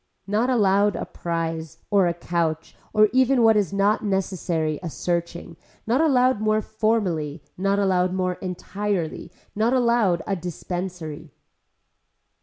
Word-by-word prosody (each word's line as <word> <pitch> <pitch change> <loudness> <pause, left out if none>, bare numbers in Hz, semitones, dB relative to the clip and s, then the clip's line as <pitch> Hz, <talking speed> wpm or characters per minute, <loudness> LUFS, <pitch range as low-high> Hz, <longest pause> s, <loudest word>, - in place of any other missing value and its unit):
Not 215 +5 +1
allowed 205 -4 +3
a - - -3
prize 165 -2 -4
or 195 -3 +4
a 170 - 0
couch 165 -2 -2 0.2
or 215 0 +5
even 260 -1 +4
what 225 -1 +6
is 205 -5 +1
not 200 +2 +1
necessary 175 -6 -1
a 175 - -4
searching, 170 0 -3 0.3
not 240 +6 +2
allowed 255 -7 +3
more 215 0 +2
formerly, 190 -10 -1
not 195 +2 0
allowed 185 -2 +2
more 185 -1 0
entirely, 185 -1 -4 0.2
not 225 +4 +2
allowed 235 -9 +2
a 195 - -1
dispensary. 175 -2 -6
190 Hz, 130 wpm, -24 LUFS, 170-215 Hz, 0.3 s, what